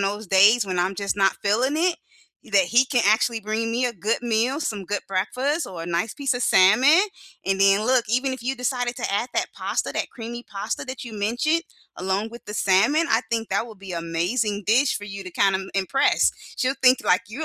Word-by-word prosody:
those 205 0 -2
days 205 +4 +5
when 185 -2 -3
I'm 185 +2 0
just 200 0 -3
not 195 -1 +2
feeling 245 +8 +1
it, 345 +1 +1 0.6
that 195 -3 +4
he 240 +7 +4
can 255 -3 +1
actually 225 +2 +2
bring 220 +2 -2
me 250 +1 +1
a 245 - -3
good 220 +4 -2
meal, 240 +5 0
some 210 -9 -3
good 205 +3 -2
breakfast, 255 - -1
or 170 -3 -7
a - - -7
nice 175 +6 -2
piece 280 -3 -1
of 245 - -2
salmon. 250 - +5 0.4
And 195 0 0
then 195 +2 +4
look, 250 -1 +3
even 255 +3 0
if 260 - -6
you 260 +3 -1
decided 245 -1 -2
to - - -3
add 215 +5 -1
that - - +1
pasta, - - -3
that - - -3
creamy 240 0 -8
pasta 205 +2 -5
that 260 -1 -7
you 235 - -9
mentioned 240 +11 0 0.3
along 190 +4 -2
with 235 +1 -12
the 210 - -7
salmon, 220 - +3
I 225 +2 +2
think 225 -1 -1
that - - -1
would 220 -4 -13
be 195 -2 -8
amazing 175 +6 -2
dish 250 +6 +2
for 205 - -8
you 200 -1 -8
to 185 - -8
kinda 195 -1 +2
im 190 0 -8
impress. 195 +8 +2 0.3
She'll 260 0 0
think 255 0 +5
like 185 +4 +3
you're 235 +9 -7
220 Hz, 220 wpm, -23 LUFS, 195-250 Hz, 0.6 s, days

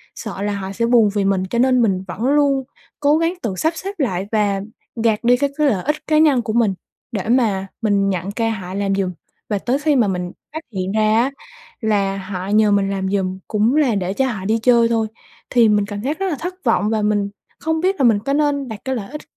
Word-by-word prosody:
sợ - - -6
là 205 0 -1
họ 195 -1 -5
sẽ 230 +4 -1
buồn 230 -3 +4
vì 200 - +1
mình 195 -1 +1
cho 235 - -1
nên 255 -1 +4
mình 190 -4 +1
vẫn 185 - -7
luôn 280 -1 +3 0.4
cố 295 +1 +3
gắng 330 +1 +1
tự 200 -4 -2
sắp 320 - 0
xếp 390 +3 -6
lại 195 - -1
và 205 -3 +1 0.4
gạt 220 0 +1
đi 245 +1 +4
cái 280 +1 +1
cái 300 -1 +3
lợi 200 -9 +1
ích 300 +2 +1
cá 305 -1 +3
nhân 295 -5 +4
của 220 -2 -3
mình 225 -5 +2 0.4
để 210 -1 -3
mà 210 -6 +2
mình 200 -2 +2
nhận 185 +1 -2
ca 225 +1 -1
họ 185 -3 -6
làm 195 0 0
giùm. 190 -2 -1 0.4
Và 205 -2 0
tới 255 +6 0
khi 295 -1 +2
mà 235 -5 +3
mình 180 -2 -2 0.2
phát 315 - -4
hiện 185 0 -2
ra 215 +1 +2
á 275 - -1 0.5
là 200 -3 +1
họ 190 -1 -5
nhờ 210 +1 +3
mình 200 -1 +2
làm 190 -1 -2
giùm 190 -1 -1
cũng 220 +4 +1
là 275 -8 +3
để 190 -1 -1
cho 265 +5 +1
họ 190 -4 -6
đi 220 +2 +2
chơi 235 -2 +5
thôi, 225 -1 0 0.4
thì 235 -3 +4
mình 205 -1 +2
cảm 205 0 -6
giác 290 +6 -2
rất 390 - 0
là 315 - -1
thất 360 +2 -4
vọng 215 -2 +2
và 220 -1 0
mình 205 -1 +1 0.3
không 320 0 -1
biết 380 +2 +2
là - - +2
mình 225 -3 +4
có 275 +7 -2
nên 285 -2 +1
đặt 220 -3 -7
cái 265 -1 -1
lợi 205 0 -6
ích 300 - -6
220 Hz, 250 wpm, -20 LUFS, 195-265 Hz, 0.5 s, chơi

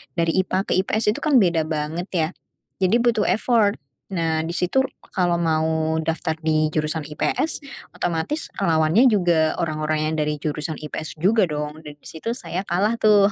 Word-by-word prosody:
dari 165 -1 +1
IPA 190 +1 0
ke - - -2
IPS 210 +2 +1
itu - - -5
kan 300 -3 +1
beda 165 -3 +1
banget 155 +4 -3
ya, 160 -1 +1 0.5
jadi 190 +4 +3
butuh 230 -3 +2
effort. 220 -2 +2 0.4
Nah 165 -3 0
di 165 - -4
situ 185 +10 +1 0.3
kalau 175 -2 +2
mau 160 -1 +1
daftar 160 0 -1
di 155 -1 +2
jurusan 155 0 -2
IPS 295 - -1 0.3
otomatis 175 - -2
lawannya 165 +7 +4
juga 175 -7 +2
orang-orang 155 -1 -1
yang - - -2
dari 150 0 0
jurusan 150 +1 -3
IPS 155 +1 -5
juga 190 +4 +3
dong 150 0 -4
dan 150 -2 -10
di 145 - -43
situ 230 +9 -4
saya 190 -5 -5
kalah 210 +6 +1
tuh. 205 -1 +5
165 Hz, 165 wpm, -22 LUFS, 155-200 Hz, 0.5 s, tuh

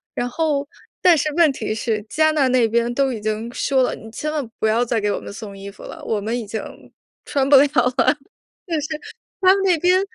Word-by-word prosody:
然 245 - -1
后 290 0 -1 0.3
但 355 -2 +6
是 305 +1 0
问 335 -3 +5
题 220 -5 -3
是 220 -2 -2
加 315 0 +3
纳 290 -4 +2
那 250 -3 +3
边 235 +1 +1
都 270 0 +1
已 220 - -6
经 215 +2 -3
说 265 -2 +1
了， - - 0
你 220 - -12
千 305 +6 -4
万 290 -6 -3
不 - - 0
要 225 +3 +2
再 230 -1 0
给 205 0 0
我 - - -2
们 - - -9
送 205 -1 -8
衣 195 0 -8
服 - - -15
了， - - -9
我 220 - -1
们 225 +4 -2
已 220 - -7
经 220 +2 -4 0.6
穿 275 -2 0
不 285 - +7
了 275 - +7
了。 - - -3 0.4
就 - - +5
是 295 - -5 1.2
它 375 0 +7
们 390 - -1
那 360 -3 +4
边 365 +2 +4
250 Hz, 255 characters per minute, -21 LUFS, 220-300 Hz, 1.2 s, 不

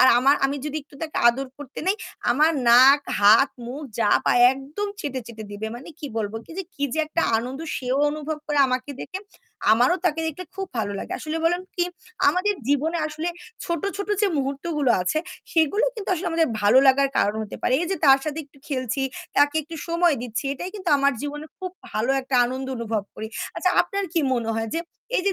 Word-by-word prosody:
আর 255 - +8
আমা 270 +2 +4
আমি 275 +1 +1
যদি 300 0 -3
একটু 285 - -21
তাকে 315 - -5
আদর 265 +3 0
করতে 285 -2 -9
নেই, 390 +3 +2 0.3
আমার 300 +6 +4 0.2
নাক, 260 +4 +8 0.2
হাত, 210 +7 +7 0.2
মুখ 270 +5 -6 0.2
যা 215 - +3 0.2
পায় 245 - +5
একদম 290 +10 -5
চেটে, 265 -5 -3
চেটে, 220 -2 -8
দিবে। 205 +2 -4
মানে 270 - -11
কি 295 - -6
বলব 215 -2 -2
কি - - -15
যে 385 - -1
কি 285 - -2
যে 315 - -3
একটা 330 +2 -1 0.2
আনন্দ 255 +5 -5 0.2
সেও 255 +1 -1
অনুভব 305 0 -4
করে 295 -1 0
আমাকে 255 +2 -2
দেখে। 380 - -5 0.5
আমারও 245 +11 +4
তাকে 325 -2 +1
দেখলে 320 +4 -4
খুব 385 0 -4
ভালো 205 -2 -1
লাগে। - - -6
আসলে 310 +1 -4
বলুন 350 +2 +2
কি, 350 - +1 0.4
আমাদের 365 +7 +1
জীবনে 310 +4 +1
আসলে 310 +2 -4 0.4
ছোট, 340 -3 -2
ছোট, 400 0 -4
যে 415 - +5
মুহূর্তগুলো 280 0 -1
আছে 185 +12 0 0.3
সেগুলো 325 +6 +3
কিন্তু 425 -4 -7
আসলে 355 +1 -3
আমাদের 330 -1 +2
ভালো 205 +5 +6
লাগার 275 +1 +5
কারণ 205 +1 +2
হতে 215 - -7
পারে। - - +1
এই - - -1
যে 385 - -1
তার 270 -1 +7
সাথে 305 0 -3
একটু 275 0 -23
খেলছি, 260 -1 -2 0.3
তাকে 290 +1 +4
একটু 325 +2 -9
সময় 340 -1 +3
দিচ্ছি 240 +2 -4
এটাই 355 +7 -5
কিন্তু 375 -4 -4
আমার 280 0 +3
জীবনে 295 +1 -5
খুব 370 -1 -5 0.2
ভালো 220 +5 0
একটা 260 0 -4
আনন্দ 260 +2 -3
অনুভব 225 -3 -2
করি। 220 - -5 0.3
আচ্ছা, 365 - +2
আপনার 395 +2 -3
কি 335 - +2
মনে 235 -2 -1
হয় 225 0 -2
যে, 330 - 0 0.4
এই - - +1
যে 395 - +3
285 Hz, 205 wpm, -24 LUFS, 255-330 Hz, 0.5 s, আর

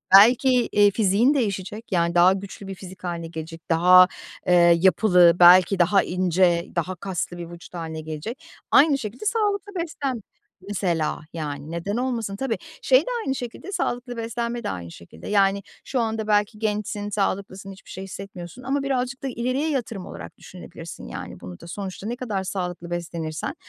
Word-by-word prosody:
Belki, 235 +6 +7 0.2
eee, 205 0 +5
fiziğin 215 +6 +3
değişecek, 210 -3 -3
yani, 170 -1 +1
daha 175 +2 +6
güçlü 195 0 -7
bir 195 - -6
fizik 185 0 -12
hâline 170 -2 -4
gelecek, 165 0 -8
daha, 180 +2 +7 0.4
eee, 180 - +4 0.3
yapılı, 180 -2 +5
belki 180 +2 +7
daha 190 +3 +4
ince, 180 -1 +2
daha 180 +2 -1
kaslı 175 -1 -4
bir 170 -1 -7
vücut 175 +1 -12
hâline 160 -2 -5
gelecek. 160 - -6 0.3
Aynı 285 0 +6
şekilde 235 - -7
sağlıklı 410 -2 0
beslen 285 -8 -3 0.5
mesela, 175 -6 -1
yani, 150 -2 -5
neden 170 +6 -3
olmasın? 235 -5 -2
Tabii, 245 +1 -2 0.2
şey 260 +1 +5
de - - -11 0.2
aynı 270 - 0
şekilde, 245 - -7
sağlıklı 245 -10 -3
beslenme 235 +1 -3
de - - -2
aynı 85 -2 -6
şekilde. 85 -1 -12
Yani, 200 -1 +2 0.2
şu 260 - -2
anda 220 -2 -1
belki 210 0 +1
gençsin, 210 -1 -2
sağlıklısın, 195 -1 -2
hiçbir 195 - -15
şey 190 - -7
hissetmiyorsun 195 +2 -9
ama 275 +2 -1
birazcık 265 -1 -2
da - - -1
ileriye 255 +5 -1
yatırım 230 -9 -3
olarak - - -10
düşünebilirsin, 170 -2 -10
yani, 90 0 -8
bunu 90 -1 -9
da. - - -12
Sonuçta 195 +2 -6
ne 240 - -2
kadar 215 -7 -3
sağlıklı 180 -2 -4
beslenirsen, 165 -2 -4
195 Hz, 165 wpm, -24 LUFS, 175-235 Hz, 0.5 s, Belki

